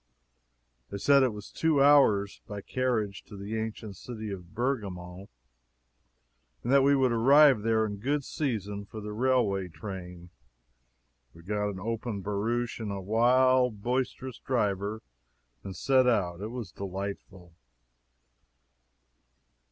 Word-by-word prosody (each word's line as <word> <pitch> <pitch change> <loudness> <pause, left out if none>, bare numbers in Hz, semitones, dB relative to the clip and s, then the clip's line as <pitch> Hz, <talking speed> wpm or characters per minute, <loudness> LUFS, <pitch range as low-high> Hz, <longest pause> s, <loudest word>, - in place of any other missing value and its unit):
They 100 - -5
said 140 +7 +5
it 130 -2 +3
was 105 -1 -10
two 160 -3 +1
hours, 110 -9 +4
by 100 -1 -6
carriage 110 -5 -1
to 105 - -11
the 100 +3 -5
ancient 110 -2 -5
city 110 -2 -7
of 90 0 -9
Bergamo, 100 -7 -3 1.3
and 120 - -1
that 140 - +6
we 140 +1 +4
would 130 -2 +2
arrive 135 +1 +6
there 110 0 +2
in 105 -1 -4
good 140 +7 -1
season 105 -9 -3
for 110 - -8
the 105 0 -6
railway 110 -6 +1
train. 90 -1 -9 1.0
We 85 - -15
got 105 +2 -1
an 95 -2 -6
open 110 0 -3
barouche 115 +5 -2
and 110 -3 -4
a 100 - -4
wild, 125 +2 +3
boisterous 130 +1 -2
driver, 105 -3 -1 0.6
and 95 - -7
set 130 -2 +3
out. 95 -7 +1
It 105 - -3
was 115 -6 -6
delightful. 95 -2 -7
110 Hz, 130 wpm, -28 LUFS, 100-125 Hz, 1.3 s, that